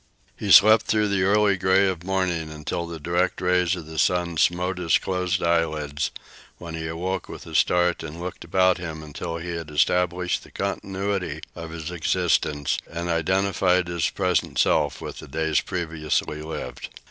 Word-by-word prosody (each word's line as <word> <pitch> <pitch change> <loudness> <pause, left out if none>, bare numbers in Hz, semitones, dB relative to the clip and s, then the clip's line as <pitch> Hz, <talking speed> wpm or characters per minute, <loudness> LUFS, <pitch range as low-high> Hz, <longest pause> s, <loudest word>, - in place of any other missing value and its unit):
He - - -5
slept 110 +1 +8
through 105 -1 +2
the 100 -2 +1
early 100 +1 +3
gray 95 +1 +3
of 90 -3 -3
morning 90 -4 -1
until 80 +2 -4
the 85 -1 -7
direct 85 +4 0
rays 90 0 +2
of 85 -3 -8
the 80 0 -6
sun 90 -2 +1
smote 90 +3 +1
his 85 -3 +3
closed 90 -1 -1
eyelids, 75 -4 0 0.5
when 85 -1 -8
he 80 0 -4
awoke 90 +3 -3
with - - -9
a 80 - -10
start 90 +2 +2
and 80 +1 -7
looked 90 +1 -6
about 90 +2 +2
him 80 -3 -6
until 85 +3 -5
he 85 +1 -6
had 85 -2 -5
established 90 +3 +1
the - - -15
continuity 95 -4 -3
of 85 -1 -7
his 80 0 -6
existence 85 -4 0
and 85 +1 -4
identified 90 +1 +2
his 85 -2 0
present 90 -2 0
self - - +2
with - - -7
the - - -10
days 80 +2 0
previously 80 -4 -2
lived. 80 +1 -6
85 Hz, 170 wpm, -24 LUFS, 80-95 Hz, 0.5 s, slept